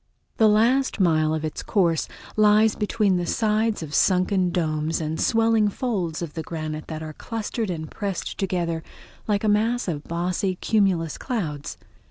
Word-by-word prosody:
The 220 Hz, -1 st, +5 dB
last 235 Hz, +5 st, +3 dB
mile 155 Hz, -4 st, +3 dB
of 155 Hz, 0 st, -1 dB
its 155 Hz, -, -4 dB
course 170 Hz, -6 st, +1 dB, 0.3 s
lies 215 Hz, +1 st, +5 dB
between 210 Hz, -3 st, +1 dB
the 175 Hz, -1 st, -2 dB
sides 215 Hz, -2 st, +1 dB
of 150 Hz, -2 st, -8 dB
sunken 185 Hz, +1 st, +3 dB
domes 160 Hz, -2 st, -1 dB
and 160 Hz, 0 st, -3 dB
swelling 225 Hz, -2 st, +3 dB
folds 190 Hz, -8 st, -2 dB
of 155 Hz, -3 st, -6 dB
the 160 Hz, -, -4 dB
granite 155 Hz, -1 st, -5 dB
that 160 Hz, -1 st, -5 dB
are 155 Hz, -1 st, -6 dB
clustered 225 Hz, +3 st, -4 dB
and 160 Hz, -3 st, -4 dB
pressed 200 Hz, -4 st, -4 dB
together 175 Hz, -4 st, -1 dB, 0.5 s
like 205 Hz, -1 st, +1 dB
a -, -, +1 dB
mass 225 Hz, +3 st, +1 dB
of 155 Hz, -4 st, -3 dB
bossy 180 Hz, +2 st, -1 dB
cumulus 180 Hz, -6 st, +1 dB
clouds. 160 Hz, -, -4 dB
185 Hz, 160 wpm, -24 LUFS, 160-215 Hz, 0.5 s, The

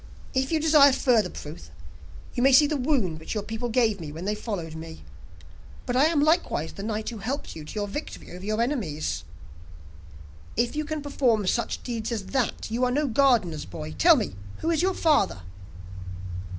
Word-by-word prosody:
'If 265 Hz, +1 st, 0 dB
you 320 Hz, -, +2 dB
desire 300 Hz, -3 st, +6 dB
further 230 Hz, -8 st, +3 dB
proof, 150 Hz, -, -9 dB, 0.6 s
you 245 Hz, -, -1 dB
may 270 Hz, +2 st, +6 dB
see 270 Hz, +3 st, +8 dB
the 300 Hz, +1 st, 0 dB
wound 250 Hz, -, 0 dB
which 160 Hz, -, -6 dB
your 210 Hz, -, -1 dB
people 225 Hz, +3 st, -4 dB
gave 225 Hz, -4 st, +2 dB
me 155 Hz, -3 st, -6 dB
when 165 Hz, +4 st, -7 dB
they 210 Hz, -, 0 dB
followed 200 Hz, -7 st, -4 dB
me. 160 Hz, -, -9 dB, 0.8 s
But 245 Hz, -, -2 dB
I 265 Hz, +3 st, +5 dB
am 315 Hz, -2 st, +3 dB
likewise 310 Hz, -, +1 dB
the -, -, -8 dB
knight 215 Hz, +1 st, -3 dB
who 230 Hz, -3 st, -7 dB
helped 260 Hz, +8 st, -4 dB
you 160 Hz, -, -7 dB
to 150 Hz, -, -9 dB
your 205 Hz, -1 st, -1 dB
victory 295 Hz, +10 st, -7 dB
over 180 Hz, -, -9 dB
your 215 Hz, +3 st, 0 dB
enemies.' 155 Hz, -, -2 dB, 1.3 s
'If 240 Hz, +4 st, +1 dB
you 305 Hz, 0 st, -1 dB
can 310 Hz, -1 st, -4 dB
perform 245 Hz, -7 st, +1 dB
such 235 Hz, +5 st, -1 dB
deeds 230 Hz, -2 st, -3 dB
as 215 Hz, -4 st, -3 dB
that, 245 Hz, -4 st, -1 dB
you 240 Hz, +3 st, 0 dB
are 250 Hz, -, +3 dB
no 290 Hz, +4 st, +1 dB
gardener's 230 Hz, -, +2 dB
boy; 80 Hz, -3 st, -7 dB
tell 85 Hz, -, +6 dB
me, -, -, -2 dB, 0.2 s
who 330 Hz, -, -1 dB
is 325 Hz, -, +2 dB
your 375 Hz, +1 st, +1 dB
father? 285 Hz, -, +2 dB
230 Hz, 190 wpm, -26 LUFS, 185-280 Hz, 1.3 s, see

